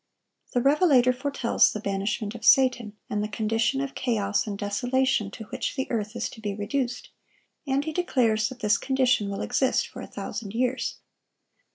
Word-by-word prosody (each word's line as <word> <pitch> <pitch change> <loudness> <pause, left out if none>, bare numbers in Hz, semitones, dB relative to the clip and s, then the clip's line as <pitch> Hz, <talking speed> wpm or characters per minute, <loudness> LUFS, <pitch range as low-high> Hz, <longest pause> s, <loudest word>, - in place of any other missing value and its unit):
The 245 - +2
revelator 275 -4 +4
foretells 265 -2 +2
the 215 - -4
banishment 205 +1 -2
of 235 - -10
Satan, 245 -5 +4
and 210 0 -1
the - - -1
condition 225 +5 0
of 275 -1 -4
chaos 210 -4 0
and 200 -1 -4
desolation 245 +2 0
to 220 - -9
which - - -3
the 265 -1 -1
earth 215 -1 -2
is 235 - -2
to 220 - -12
be 205 -2 -3
reduced; 245 +4 -3 0.6
and 275 +1 +1
he 315 - -3
declares 245 -11 +1
that 255 -1 -11
this 210 -1 +3
condition 260 -6 +1
will 200 - -4
exist 255 +1 +1
for - - -10
a - - -7
thousand 210 -1 -6
years. 255 +2 0
240 Hz, 175 wpm, -26 LUFS, 210-265 Hz, 0.6 s, revelator